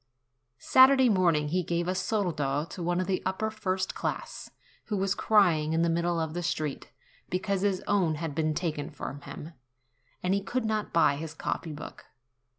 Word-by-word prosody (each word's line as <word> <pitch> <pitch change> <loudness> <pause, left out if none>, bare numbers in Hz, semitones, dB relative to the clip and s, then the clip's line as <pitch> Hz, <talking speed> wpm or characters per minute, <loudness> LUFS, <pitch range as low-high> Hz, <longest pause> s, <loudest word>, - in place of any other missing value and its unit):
Saturday 260 - +6
morning 170 -7 +2
he 180 +4 +1
gave 170 0 -1
a 185 - +1
soldo 170 -7 -1
to 175 - -9
one 175 +1 0
of 185 - 0
the 185 0 -1
upper 190 +4 -1
first 185 -3 -2
class, - - -4 0.4
who 210 - -2
was 195 0 +1
crying 170 -9 +3
in 165 +1 +2
the 170 - +2
middle 170 0 0
of 160 -1 -2
the 175 - -3
street, 155 -4 -3 0.4
because 190 +1 -1
his 195 -2 0
own 185 -6 +2
had 160 -1 -4
been 155 0 0
taken 155 -4 -2
from 145 -1 -7
him, 160 +3 -9 0.7
and 180 +1 +1
he 200 - +1
could 235 +5 -2
not 215 -1 -1
buy 150 -4 +3
his 160 +1 -6
copy 160 - -3
book. 150 - -9
175 Hz, 180 wpm, -28 LUFS, 160-195 Hz, 0.7 s, Saturday